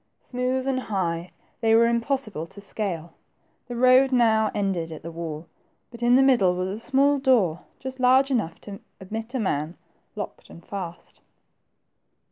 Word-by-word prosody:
Smooth 255 +1 -2
and 265 -1 0
high, 180 -7 -2 0.3
they 225 -1 +3
were 230 +1 +6
impossible 235 - -1
to 195 +3 -11
scale. 190 -5 -4 0.5
The 245 - -6
road 255 +2 +5
now 220 -3 +3
ended 185 -5 -1
at 160 - -8
the 165 - -6
wall, 165 -1 -6 0.5
but 235 -1 -12
in 240 +1 +4
the 265 - +6
middle 235 -10 +4
was 185 +1 -2
a 200 +3 -4
small 275 +4 +2
door, 220 - +2 0.2
just 260 0 -7
large 260 +2 +4
enough 215 -10 -1
to 200 -1 -9 0.2
admit 220 +6 -6
a - - 0
man, 160 -5 -2 0.4
locked 205 -2 -7
and 170 - -14
fast. 180 -4 -8
220 Hz, 160 wpm, -25 LUFS, 180-255 Hz, 0.5 s, were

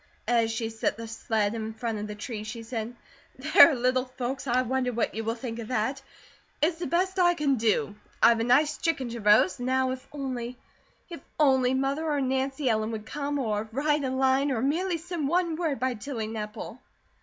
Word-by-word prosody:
As 230 -2 +3
she 225 0 -3
set 225 -1 -1
the 230 0 -7
sled 220 -2 -1
in 220 -1 -5
front 225 -1 -3
of 210 - -4
the 210 - -6
tree 210 0 -6
she 220 +2 -7
said: 230 0 -5 0.4
"There, 310 +3 +7
little 255 +1 +1
folks, 260 +1 -5
I 250 +1 +2
wonder 255 0 0
what 235 -1 -1
you 225 - -3
will 225 +1 -1
think 235 -1 -6
of 225 - -6
that! 255 +3 -1 0.6
It's 325 +2 +1
the 350 - -3
best 375 +2 0
I 350 -1 +4
can 285 -4 +1
do. 215 -2 +1 0.3
I've 235 -1 +5
a - - +1
nice 295 +6 +3
chicken 290 -7 -1
to 235 0 -6
roast; 210 -2 +4
now 260 +1 +1
if 255 0 -7
only, 255 -4 -5 0.5
if 335 - -7 0.2
only 265 -3 +4
Mother 275 +4 -1
or 295 -1 +1
Nancy 265 +1 -1
Ellen 220 -2 +1
would 220 -1 -5
come, 290 +3 -3
or 215 -4 -2
write 295 +4 +1
a 265 - -1
line, 265 +2 +2
or 240 -2 -1
merely 340 +6 0
send 325 -3 -3
one 340 +1 +1
word 315 -6 -1
by 260 +1 0
Tilly 230 0 -5
Nepple." 220 +2 -6
255 Hz, 200 wpm, -27 LUFS, 225-285 Hz, 0.6 s, There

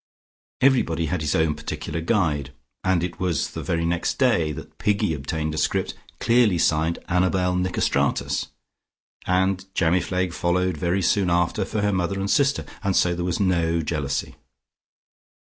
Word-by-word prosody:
Everybody 100 -12 +3
had 80 +2 -2
his 75 -1 0
own 80 -1 +2
particular 75 +1 -5
guide, 80 - 0 0.3
and 95 -2 +2
it 90 0 -4
was 90 -5 -1
the - - -5
very 85 0 -1
next 85 +1 -1
day 100 - +2
that 75 - -10
Piggy 100 -5 +1
obtained 75 +2 -3
a 80 - -2
script - - 0 0.3
clearly 115 -5 +3
signed 80 +1 +1
Annabel 90 0 +1
Nicostratus 90 0 0 0.8
and 95 +1 +1
Jamifleg 90 +1 +1
followed 90 +1 0
very 90 +5 0
soon 95 +1 +2
after 90 +3 +1
for 105 - -2
her 105 0 +1
mother 95 +1 -1
and 100 +1 -1
sister, 140 -1 +2 0.2
and 95 -1 0
so 90 - +3
there 85 0 -3
was 90 -1 -1
no 85 -4 +1
jealousy. 75 -4 -2
90 Hz, 150 wpm, -24 LUFS, 80-95 Hz, 0.8 s, Everybody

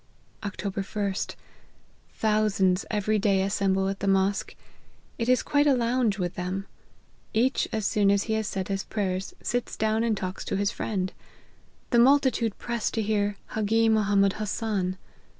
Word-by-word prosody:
" - - -35
Oct. 205 0 -6 0.4
ls. 195 +1 -1 0.9
Thousands 210 -4 +2
every 215 0 +1
day 195 -2 +2
assemble 195 -1 +1
at 195 0 -3
the 200 - -2
mosque; 195 +1 +1 0.6
it 230 +1 0
is 255 - +4
quite 290 0 +2
a 280 - +5
lounge 235 -3 +1
with 180 -2 -2
them. 185 +2 -3 0.7
Each, 250 +4 +2
as 220 -2 -2
soon 205 -2 +3
as 200 0 +3
he 220 - -2
has 220 -1 -1
said 190 -2 -3
his 195 -1 -1
prayers, 190 -3 -3
sits 245 0 -2
down 220 +1 +1
and 225 -3 +1
talks 185 0 -4
to - - -1
his 200 0 +1
friend. 190 -3 -2 0.8
The 240 - +5
multitude 255 -4 +3
press 235 -2 -2
to 225 - -2
hear 205 -1 0
Hagi 225 +1 +2
Mohammed 200 -3 +3
Hasan. 205 -3 -1
205 Hz, 160 wpm, -27 LUFS, 195-225 Hz, 0.9 s, a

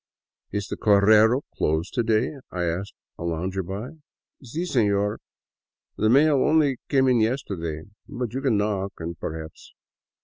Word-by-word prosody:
" - - -69
Is 100 0 -2
the - - -5
correo 110 +4 +5
closed 80 +4 -1
to 120 - +1
day? 110 +4 +1
" - - -49
I 90 -1 -2
asked 85 +4 -3 0.2
a - - -5
lounger 90 +3 -2
by. 100 - -7 0.2
" - - -29
Si, 150 +8 -4
seiior, 105 - +1 0.8
the 110 - +1
mails 140 +3 +5
only 150 -4 +3
came 135 -2 +3
in 125 -2 +4
yesterday. 95 - -2 0.3
But 125 -4 -4
you 135 - -2
can 130 -6 +2
knock 100 -1 -1
and 85 +1 -5
perhaps. 80 0 -8
105 Hz, 165 wpm, -24 LUFS, 95-130 Hz, 0.8 s, correo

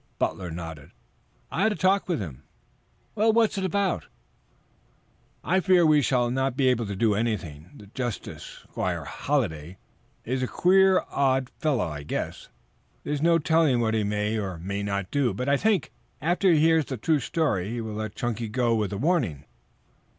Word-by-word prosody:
Butler 90 -2 -2
nodded. 80 -3 -8 0.6
"I 175 - -2
had 220 +1 +3
a - - -6
talk 190 +1 +2
with 170 - 0
him." 80 -11 -7 0.7
"Well, 220 +1 +3
what 225 -1 +2
about 190 - 0
it?" - - -26 1.3
"I 185 +3 +2
fear 185 -2 +4
we 155 -2 +5
shall 125 -2 +1
not 135 0 -1
be 135 -2 +3
able 120 -3 0
to 100 - -4
do 110 +1 +2
anything. 90 -8 -3
The 105 - -13
justice, 120 +2 -6
Squire - - -2
Halliday, 80 +4 -2 0.5
is 130 +2 -1
a 130 - 0
queer 190 - +4
old 130 -2 +2
fellow, 145 -9 0
I 75 -3 -5
guess. 75 - -4 0.6
There 145 - -3
is 145 - -2
no 170 +1 +4
telling 160 -5 +2
what 110 -1 +1
he 110 -1 +1
may 105 +1 -1
or 95 -4 -4
may 100 +4 -4
not 100 -2 -3
do, 130 -8 +1
but 125 +6 -3
I 140 - +4
think, 200 - +1 0.3
after 175 +5 +2
he 160 - +4
hears 160 -1 +4
the 130 - -5
true 150 +7 +1
story, 115 - -1
he 120 +1 -3
will 110 -2 -5
let 110 -1 -5
Chunky 120 -2 -3
go 120 +1 +1
with 105 -3 0
a 100 - -3
warning." 120 - 0
125 Hz, 180 wpm, -26 LUFS, 100-160 Hz, 1.3 s, we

